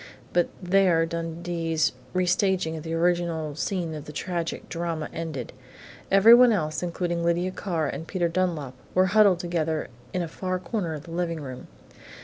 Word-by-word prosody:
But 175 0 +3
there 180 -3 +3
Dundee's 165 -1 -1 0.2
restaging 180 -2 +1
of 160 - -5
the 165 +1 -3
original 170 -3 0
scene 170 +1 -2
in 150 -2 -6
the 150 - -9
tragic 170 +2 -3
drama 165 -2 -3
ended. 160 -7 -5 0.6
Everyone 230 +5 +8
else, 155 -7 0
including 175 -1 -2
Lydia 170 +2 +1
Carr 170 -5 -2
and 165 - -5
Peter 175 -1 0
Dunlap, 165 -6 -1 0.2
were 185 +1 +5
huddled 205 -4 +6
together 165 -4 -2 0.2
in 180 - -1
a - - -3
far 185 +3 -3
corner 185 -3 -3
of 150 - -8
the 165 - -11
living 170 -1 -2
room. 130 -4 -8
170 Hz, 155 wpm, -26 LUFS, 160-180 Hz, 0.6 s, Everyone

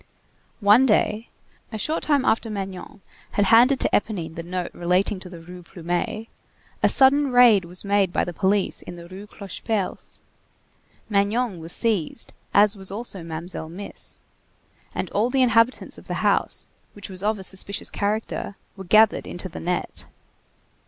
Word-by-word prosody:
One 210 +6 +6
day, 215 0 +1 0.4
a 220 - -4
short 305 +10 -1
time 285 -4 +1
after 225 0 +1
Magnon 195 -1 -6 0.3
had 205 - +2
handed 250 +4 +6
to - - +2
Éponine 185 -7 -1
the 170 - -6
note 180 +1 -4
relating 180 +3 0
to 185 - -9
the 175 - -10
Rue 180 +2 -11
Plumet, 175 +5 -3 0.6
a - - +4
sudden 275 +1 +5
raid 240 -7 +6
was 180 +3 -6
made 200 -2 +2
by - - +1
the 175 - -4
police 195 +2 +1
in 175 - -9
the 170 0 -11
Rue 190 +3 -10
Clocheperce; 200 0 -4 0.9
Magnon 205 0 0
was 165 +1 -4
seized, 220 -2 0 0.2
as 205 +1 +4
was 190 -1 -4
also 205 -2 -4
Mamselle 165 0 -5
Miss; 195 +4 -8 0.8
and - - -2
all 215 +4 +1
the 260 0 +3
inhabitants 230 +1 +2
of - - -18
the - - -3
house, - - +1 0.3
which 205 - -9
was 185 -1 -5
of 215 +1 0
a 190 - -8
suspicious 190 +1 -1
character, 205 0 -2 0.2
were 190 -1 -9
gathered 215 +4 +4
into 180 +2 -5
the - - -8
net. 180 +1 -3
200 Hz, 160 wpm, -23 LUFS, 180-220 Hz, 0.9 s, One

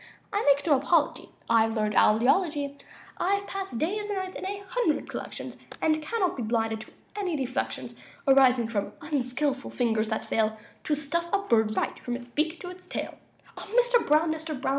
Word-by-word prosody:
I 410 - +1
make 280 0 +4
no 295 -4 +5
apology; 300 +3 +1 0.2
I've 225 -1 +3
learned 215 -1 0
owl 215 +2 +5
eology. 285 0 +2 0.4
I've 400 +2 +1
passed 385 -12 -4
days 415 - -1
and 410 - -1
nights 375 0 -4
in 375 - -4
a 400 0 -5
hundred 475 -9 0
collections, - - -6 0.2
And 310 0 +2
can 445 +9 -3
not 365 - +2
be 255 - -4
blinded 225 -1 0
to 220 - -11 0.2
any 380 -5 -1
deflections 255 - -3 0.3
Arising 260 -3 +5
from 210 -3 -2
unskilful 275 -2 -1
fingers 225 -3 +1
that 220 0 -2
fail 220 0 +1 0.3
To 300 - +2
stuff 310 +4 -1
a - - +4
bird 220 - +1
right, - - -1
from 245 - -3
his 245 0 -8
beak 315 +6 0
to 355 - -6
his 365 0 -11
tail. - - -5 0.6
Mister - - +5
Brown! 310 -3 +3
Mister 315 0 -4
Brown! 265 - -2
290 Hz, 185 wpm, -27 LUFS, 235-360 Hz, 0.6 s, no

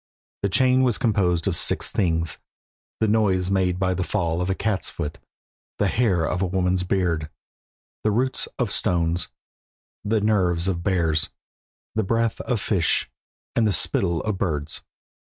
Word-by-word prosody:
This 100 - +1
chain 130 0 +4
was 125 -4 +2
composed 90 -7 +1
of - - +2
six - - 0
things 85 -4 0 0.6
the 110 - +2
noise 100 -4 +2
made 90 -2 +2
by 95 0 +1
the 90 0 -1
fall 85 +1 -1
of 90 - -1
a 95 - +1
cat's 105 -2 -1
foot, 75 -3 -5 0.6
the - - +1
hair 95 -9 +2
of 90 +3 -1
a 95 - +2
woman's 90 0 +1
beard, 90 -4 0 0.7
the 110 - +3
roots 125 +5 0
of 120 -6 0
stones, 85 -4 +1 0.8
the 110 +2 +1
nerves 95 -5 +2
of 90 -3 -1
bears, 85 -5 +1 0.6
the 110 - +1
breath 115 +2 0
of 125 -4 -1
fish, 95 -4 +1 0.4
and 115 -2 +3
the 105 - +1
spittle 85 -4 +1
of 105 -3 -2
birds. 75 -5 -2
95 Hz, 155 wpm, -24 LUFS, 85-105 Hz, 0.8 s, chain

